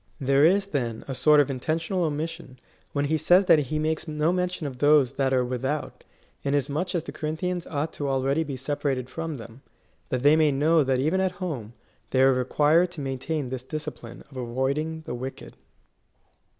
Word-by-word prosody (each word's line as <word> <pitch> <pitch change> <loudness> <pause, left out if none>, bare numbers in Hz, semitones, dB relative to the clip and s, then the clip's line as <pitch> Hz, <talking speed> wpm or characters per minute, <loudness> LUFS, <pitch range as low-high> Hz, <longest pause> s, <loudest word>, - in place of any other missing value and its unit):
There 140 +1 +4
is, 195 +4 +4
then,^ 120 - -3
a 135 - -3
sort 150 +3 +5
of 145 -1 +3
intentional 165 +7 -1
omission, 155 -3 -4 0.3
when 145 0 0
he 155 +2 +1
says 180 +5 +4
that 165 -4 +6
he 150 +1 -2
makes 155 +2 -1
no 155 +2 +1
men 180 0 0
tion 180 -3 -6
of 130 -3 -6
those 145 -3 +5
that 135 -1 0
are 130 -1 +2
without, 130 +4 -3 0.4
inasmuch 145 +6 -1
as 165 - 0
the - - -7
Corinthians 170 +3 -3
ought 150 +1 -3
to 145 - -4
be - - 0
already 135 +2 0
separated 135 -2 -2
from 165 0 -4
them, 115 +1 -11 0.5
that 125 0 -2
they 145 +2 +6
may 155 -2 +4
know 155 +3 +3
that 130 -1 +1
even 155 +8 +1
at 185 -1 0
home^ 145 - -5 0.4
they 130 0 +3
required 145 +6 +3
to 165 - -8
maintain 135 +1 -3
this 130 -1 -4
discipline 150 -3 -7
of 135 - -11
avoiding 135 +6 -2
the 120 - -5
wicked. 130 +2 -7
145 Hz, 185 wpm, -26 LUFS, 130-160 Hz, 0.5 s, that